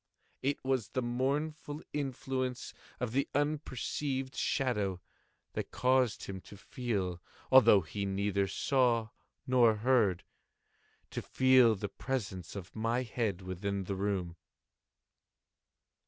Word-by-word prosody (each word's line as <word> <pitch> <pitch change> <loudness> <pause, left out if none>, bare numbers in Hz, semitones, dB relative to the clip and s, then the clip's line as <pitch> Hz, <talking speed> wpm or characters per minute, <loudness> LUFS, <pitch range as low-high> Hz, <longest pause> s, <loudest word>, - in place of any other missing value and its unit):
And 135 - +1
it 140 - -4
was 130 -5 +1
the 130 - -2
mournful 145 +5 -2
influence 130 -2 -3 0.3
of 125 -2 -2
the 135 +3 0
unperceived 140 -2 -1
shadow 105 -9 0 0.5
that - - -3
caused 130 -2 +2
him 95 -1 -6
to 100 - -13
feel—although 105 +1 +2
he 100 +5 -4
neither 100 0 0
saw 120 +1 +2 0.4
nor 125 -4 +5
heard—to 105 -5 -2
feel 130 -3 +5
the 100 +1 -3
presence 100 -7 -4
of 95 -2 -8
my 115 +3 0
head 110 -5 -2
within 95 +2 -3
the 95 +1 -3
room. 95 -3 -2
115 Hz, 110 wpm, -32 LUFS, 100-130 Hz, 0.5 s, nor